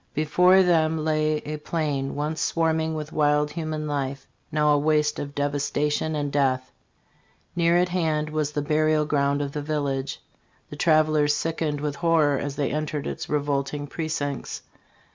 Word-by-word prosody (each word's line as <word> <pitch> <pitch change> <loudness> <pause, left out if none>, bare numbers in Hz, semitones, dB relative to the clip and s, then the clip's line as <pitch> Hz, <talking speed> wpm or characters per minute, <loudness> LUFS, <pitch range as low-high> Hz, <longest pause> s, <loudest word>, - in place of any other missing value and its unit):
"Before 180 +5 +5
them 160 -3 +2
lay 155 -1 +1
a 150 +1 -4
plain 150 -3 -2
once 150 +2 -2
swarming 160 -1 0
with 155 0 -5
wild 150 0 +2
human 155 -1 -4
life, 140 -2 -3 0.3
now 150 0 +3
a - - +4
waste 150 0 +1
of 140 0 -6
devastation 145 +2 -1
and 145 -1 -2
death. 130 -2 0 0.8
Near 170 0 +3
at 180 0 +1
band 155 -4 0
was 155 -1 -1
the 145 - -1
burial 155 0 +2
ground 140 -1 +1
of 140 - -4
the 150 - -4
village. 140 -2 -2 0.5
The - - -6
travelers 155 -1 +3
sickened 155 -2 -2
with 145 -1 -3
horror 160 -5 +3
as 140 -1 -4
they 145 -2 -1
entered 150 0 -3
its - - -5
revolting 145 0 -1
precincts. 145 -3 -4
150 Hz, 155 wpm, -25 LUFS, 145-155 Hz, 0.8 s, Before